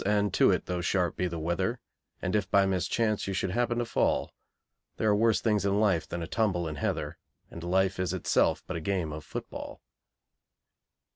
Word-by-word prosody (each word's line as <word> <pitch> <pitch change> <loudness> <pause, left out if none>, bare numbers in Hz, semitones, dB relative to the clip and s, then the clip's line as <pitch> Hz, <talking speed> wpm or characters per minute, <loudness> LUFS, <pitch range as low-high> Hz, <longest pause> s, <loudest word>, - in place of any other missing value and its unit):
and 105 -1 +1
to - - +5
it - - +1
though 90 -1 -2
sharp 90 0 0
be 90 - 0
the 85 -1 -5
weather, 85 +2 -1 0.4
And 90 - 0
if 100 -2 0
by 100 0 +4
mischance 105 +3 0
you 95 - -2
should 90 - -1
happen 120 +2 0
to 120 - 0
fall, - - 0 0.6
There 110 - 0
are 105 - +4
worse 110 +1 +3
things 105 -4 +2
in 100 +1 +2
life 95 -7 +2
than 85 -1 -4
a - - -5
tumble 95 -7 0
in 75 -1 -5
heather, 75 +1 -2 0.3
And 85 - -8
life 95 +2 +1
is 90 -3 0
itself - - +1
but 95 - -5
a - - -5
game 90 -3 -1
of 75 0 -7
football. - - -7
95 Hz, 200 wpm, -29 LUFS, 85-105 Hz, 0.6 s, to